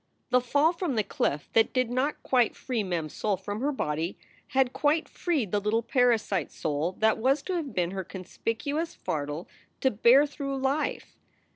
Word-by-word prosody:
The 250 Hz, 0 st, +5 dB
fall 285 Hz, +7 st, +3 dB
from 335 Hz, -6 st, -2 dB
the 215 Hz, -, +2 dB
cliff 145 Hz, -6 st, -1 dB
that 225 Hz, 0 st, +4 dB
did 255 Hz, -2 st, +1 dB
not 265 Hz, +4 st, -1 dB
quite 245 Hz, -3 st, +2 dB
free 245 Hz, -4 st, -2 dB
Mem 175 Hz, -5 st, -2 dB
s 155 Hz, -, -10 dB
soul 205 Hz, -3 st, 0 dB
from 205 Hz, +4 st, -5 dB
her 290 Hz, +2 st, +1 dB
body 160 Hz, -, -2 dB, 0.3 s
had 260 Hz, -1 st, +2 dB
quite 305 Hz, +2 st, +1 dB
freed 295 Hz, -, -1 dB
the 205 Hz, -, +2 dB
little 215 Hz, +3 st, 0 dB
parasite 230 Hz, -, +2 dB
soul 155 Hz, +3 st, -2 dB
that 220 Hz, +2 st, +2 dB
was 270 Hz, +5 st, +2 dB
to 375 Hz, -, -3 dB
have 320 Hz, -6 st, -3 dB
been 175 Hz, -1 st, +1 dB
her 190 Hz, -1 st, -3 dB
conspicuous 230 Hz, -, -3 dB
fardel 150 Hz, +2 st, -4 dB, 0.3 s
to 265 Hz, -, +3 dB
bear 240 Hz, +7 st, +6 dB
through 280 Hz, -1 st, -4 dB
life. 270 Hz, +3 st, -1 dB
235 Hz, 180 wpm, -28 LUFS, 190-275 Hz, 0.3 s, bear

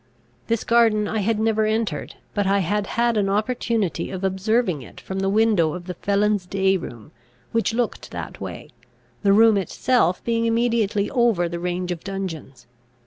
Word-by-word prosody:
This 230 Hz, -1 st, 0 dB
garden 225 Hz, -3 st, +3 dB
I 220 Hz, -, -1 dB
had 215 Hz, +2 st, +1 dB
never 220 Hz, 0 st, +1 dB
entered, 220 Hz, 0 st, -2 dB, 0.2 s
but 205 Hz, -2 st, 0 dB
I 200 Hz, +1 st, +3 dB
had 200 Hz, +2 st, 0 dB
had 235 Hz, -1 st, +2 dB
an 200 Hz, -2 st, +1 dB
opportunity 215 Hz, -1 st, -1 dB
of 190 Hz, 0 st, -6 dB
observing 190 Hz, -, 0 dB
it -, -, -12 dB
from 190 Hz, 0 st, -5 dB
the 195 Hz, 0 st, 0 dB
window 205 Hz, -7 st, +3 dB
of 175 Hz, -1 st, -8 dB
the 180 Hz, -, -5 dB
felons' 200 Hz, +1 st, 0 dB
day 195 Hz, 0 st, +2 dB
room, 120 Hz, -, -7 dB, 0.4 s
which 230 Hz, 0 st, 0 dB
looked 240 Hz, 0 st, -2 dB
that -, -, -7 dB
way, -, -, -7 dB, 0.5 s
the 200 Hz, -, +3 dB
room 220 Hz, +1 st, +6 dB
itself 195 Hz, -1 st, +1 dB
being 230 Hz, 0 st, 0 dB
immediately 230 Hz, -3 st, +1 dB
over 235 Hz, -9 st, +2 dB
the 170 Hz, 0 st, -5 dB
range 180 Hz, +1 st, -2 dB
of 170 Hz, -2 st, -5 dB
dungeons. 165 Hz, -10 st, -6 dB
205 Hz, 170 wpm, -23 LUFS, 185-225 Hz, 0.5 s, room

